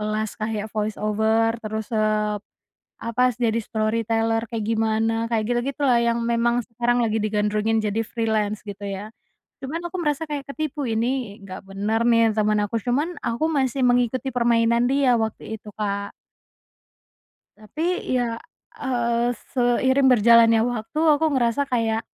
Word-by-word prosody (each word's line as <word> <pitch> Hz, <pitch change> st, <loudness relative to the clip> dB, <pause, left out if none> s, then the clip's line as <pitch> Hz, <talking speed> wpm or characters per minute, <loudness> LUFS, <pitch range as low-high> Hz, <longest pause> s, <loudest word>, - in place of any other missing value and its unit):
kelas 215 Hz, 0 st, -2 dB
kayak 215 Hz, -1 st, -2 dB
voice 215 Hz, -1 st, -2 dB
over 220 Hz, +2 st, +2 dB
terus, 220 Hz, 0 st, -5 dB
eee, 215 Hz, -1 st, +1 dB, 0.6 s
apa 250 Hz, +2 st, +1 dB
jadi 230 Hz, -1 st, -1 dB
storyteller 225 Hz, +1 st, 0 dB
kayak 225 Hz, -2 st, -2 dB
gimana 220 Hz, 0 st, +1 dB, 0.2 s
kayak 220 Hz, -2 st, 0 dB
gitu-gitu 270 Hz, +4 st, -1 dB
lah 235 Hz, -1 st, +4 dB
yang 235 Hz, 0 st, +1 dB
memang 235 Hz, +1 st, +1 dB
sekarang 240 Hz, +1 st, 0 dB
lagi 225 Hz, -2 st, +1 dB
digandrungi 210 Hz, +1 st, +1 dB
jadi 215 Hz, +1 st, -1 dB
freelance 215 Hz, -2 st, -1 dB
gitu 205 Hz, 0 st, -8 dB
ya, 200 Hz, +1 st, -5 dB, 0.6 s
cuman 290 Hz, +5 st, -3 dB
aku 360 Hz, -, -6 dB
merasa 295 Hz, +1 st, 0 dB
kayak 290 Hz, -2 st, -5 dB
ketipu 300 Hz, -1 st, -4 dB
ini 230 Hz, -1 st, -2 dB
nggak 190 Hz, -1 st, -9 dB
bener 205 Hz, +3 st, -1 dB
nih 230 Hz, -2 st, +4 dB
teman 215 Hz, -1 st, +2 dB
aku 205 Hz, +2 st, -3 dB
cuman 295 Hz, +8 st, 0 dB
aku 235 Hz, +7 st, -1 dB
masih 270 Hz, -3 st, 0 dB
mengikuti 245 Hz, +2 st, +1 dB
permainan 235 Hz, -1 st, +3 dB
dia 270 Hz, -3 st, +3 dB
waktu 220 Hz, 0 st, -3 dB
itu 210 Hz, -, -12 dB
Kak. 200 Hz, -1 st, -2 dB, 1.5 s
Tapi 320 Hz, -, -3 dB
ya, 235 Hz, -2 st, 0 dB, 0.4 s
eee, 240 Hz, -2 st, 0 dB, 0.2 s
seiring 260 Hz, +2 st, +3 dB
berjalannya 230 Hz, 0 st, +6 dB
waktu 235 Hz, +3 st, -3 dB
aku 310 Hz, -1 st, +4 dB
ngerasa 240 Hz, +2 st, +1 dB
kayak 225 Hz, -2 st, 0 dB
230 Hz, 140 wpm, -23 LUFS, 215-245 Hz, 1.5 s, berjalannya